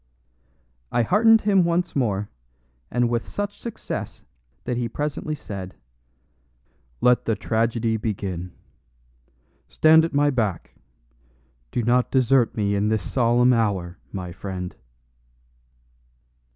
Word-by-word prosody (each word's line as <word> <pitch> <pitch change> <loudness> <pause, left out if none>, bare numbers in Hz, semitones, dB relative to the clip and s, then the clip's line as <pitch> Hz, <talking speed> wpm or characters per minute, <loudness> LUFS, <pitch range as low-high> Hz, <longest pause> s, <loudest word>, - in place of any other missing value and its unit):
I 120 - +2
heartened 220 - +5
him 195 -3 +3
once 170 +1 0
more, 105 -7 0 0.6
and 120 0 +1
with 120 0 -2
such 205 0 -4
success 235 - -6 0.4
that 125 - -2
he 120 -1 -2
presently 150 +3 -3
said, 95 -8 -8 1.3
"Let 125 0 +3
the 115 - +1
tragedy 115 +1 0
begin. 95 -5 -4 1.2
Stand 160 +1 +5
at 165 - -1
my 145 0 +3
back; 105 - -2 1.0
do 120 - -1
not 120 +2 +2
desert 130 -3 +2
me 100 -1 +1
in 100 +1 +1
this 110 -1 -1
solemn 120 0 +3
hour, 100 -6 -1
my 90 -2 -5
friend." 90 -1 -6
120 Hz, 110 wpm, -23 LUFS, 100-140 Hz, 1.3 s, heartened